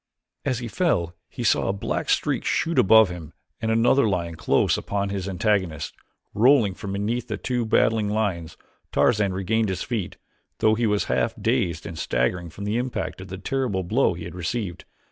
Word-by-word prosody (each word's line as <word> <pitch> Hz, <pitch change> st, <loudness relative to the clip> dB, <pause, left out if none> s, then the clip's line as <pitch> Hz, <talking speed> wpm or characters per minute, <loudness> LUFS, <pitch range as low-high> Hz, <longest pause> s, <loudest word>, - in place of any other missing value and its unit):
As 130 Hz, -, 0 dB
he 120 Hz, 0 st, -5 dB
fell 105 Hz, -, 0 dB, 0.2 s
he -, -, -6 dB
saw -, -, +2 dB
a 95 Hz, -, +1 dB
black 100 Hz, -, -3 dB
streak -, -, +1 dB
shoot 165 Hz, +1 st, +1 dB
above 110 Hz, +1 st, +6 dB
him 85 Hz, -3 st, -8 dB, 0.3 s
and 110 Hz, -, -1 dB
another 115 Hz, +2 st, +4 dB
lion 85 Hz, -3 st, -1 dB
close 80 Hz, -, +2 dB
upon 100 Hz, 0 st, -2 dB
his 100 Hz, -1 st, -3 dB
antagonist. 95 Hz, -5 st, 0 dB, 0.4 s
Rolling 115 Hz, -3 st, +4 dB
from 100 Hz, +1 st, -6 dB
beneath 110 Hz, +5 st, -2 dB
the 110 Hz, -3 st, -3 dB
two 120 Hz, 0 st, -2 dB
battling 110 Hz, -1 st, +2 dB
lions 95 Hz, -7 st, -2 dB, 0.3 s
Tarzan 105 Hz, -4 st, +2 dB
regained 105 Hz, +3 st, 0 dB
his 95 Hz, -1 st, -2 dB
feet, 110 Hz, -7 st, -3 dB, 0.4 s
though 110 Hz, -, +3 dB
he 115 Hz, +1 st, +1 dB
was 105 Hz, -1 st, +1 dB
half 65 Hz, 0 st, 0 dB
dazed 110 Hz, -9 st, 0 dB
and 80 Hz, -, -7 dB
staggering 85 Hz, +8 st, -1 dB
from 100 Hz, -, -9 dB
the 105 Hz, +3 st, -1 dB
impact 125 Hz, -5 st, -3 dB
of 95 Hz, -, -9 dB
the 95 Hz, 0 st, -6 dB
terrible 105 Hz, -2 st, -1 dB
blow 105 Hz, +1 st, +2 dB
he 85 Hz, -, -7 dB
had 85 Hz, -, -7 dB
received. 90 Hz, +1 st, -4 dB
100 Hz, 185 wpm, -24 LUFS, 90-115 Hz, 0.4 s, above